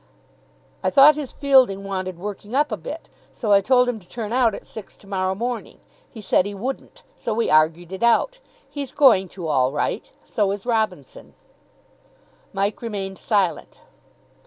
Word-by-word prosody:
"I - - +2
thought 280 +2 +7
his 295 -3 -6
fielding 260 -9 +3
wanted 185 -2 -4
working 205 +4 -7
up 295 +2 +2
a - - 0
bit, - - -8 0.2
so 215 - -3
I 200 -1 +6
told 250 +3 +3
him 245 -3 -2
to 180 -3 -21
turn 225 -2 -5
out 240 -4 +3
at - - -10
six 220 - -11
to - - -21
morrow 190 -1 -1
morning. 240 +3 -5 0.3
He 225 - -11
said 190 -1 +2
he 205 - -6
wouldn't, 270 - -6
so 225 - -3
we 230 - 0
argued 160 +3 +2
it 190 - -6
out. 235 - +2 0.3
He's 280 -3 -6
going 195 -10 +5
to 175 - -5
all 130 -4 +2
right. 145 +8 -2 0.2
So 210 -4 0
is 200 +1 -7
Robinson." 240 - -3 1.2
Mike 200 +1 -2
remained 195 -4 -5
silent. 200 -6 -1
210 Hz, 170 wpm, -22 LUFS, 190-250 Hz, 1.2 s, thought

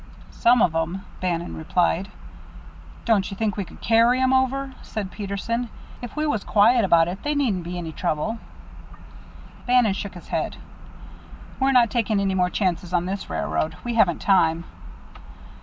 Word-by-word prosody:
"Some 240 0 +4
of 165 - +2
'em," 165 +4 -2 0.2
Bannon 175 -2 -2
replied. 175 +3 0 1.0
"Don't 210 -5 +2
you 195 - -7
think 215 -3 -1
we 200 - -2
could - - -15
carry 230 +2 +4
'em 260 0 +3
over?" 265 +1 +1
said 205 -3 -5
Peterson. 215 +4 -3 0.3
"If 245 - -8
we 305 0 -1
was 220 -9 -1
quiet 230 +3 +4
about 170 -3 +4
it, 185 +3 -5
they 295 0 -1
needn't 235 -11 +1
be 175 +1 -5
any 165 -2 -5
trouble?" 175 +7 -2 1.3
Bannon 245 -5 +4
shook 195 0 -6
his 175 - -12
head. - - -2 1.0
"We're 270 0 +3
not 245 -4 +4
taking 225 -4 +1
any 195 -1 0
more 180 -1 +2
chances 180 -2 -1
on 175 -1 +1
this 195 +2 -4
railroad. 80 0 -2
We 240 - -3
haven't 190 -7 +2
time." 165 -4 +3
200 Hz, 160 wpm, -23 LUFS, 175-235 Hz, 1.3 s, Some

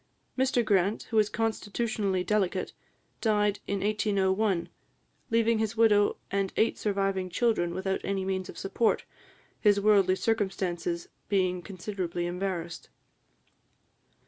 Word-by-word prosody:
Mr 255 -2 +2
Grant, 200 0 +2
who 225 - +1
was 210 -1 +4
constitutionally 215 -3 -1
delicate, 190 -2 0 0.5
died 210 -2 +2
in 200 -1 -1
1801, 200 -3 +1 0.6
leaving 230 0 +2
his 220 +1 -1
widow 210 -2 +4
and 195 -1 0
eight 225 - +2
surviving 195 -2 0
children 180 -2 +1
without 190 +1 -1
any 195 -1 -1
means 190 -1 -2
of - - -9
support, 215 +4 0 0.5
his 205 -2 +4
worldly 200 -3 +4
circumstances 185 -5 -1 0.2
being 185 -3 +1
considerably 180 -2 -4
embarrassed. 175 -1 -4
200 Hz, 115 wpm, -28 LUFS, 185-215 Hz, 0.6 s, was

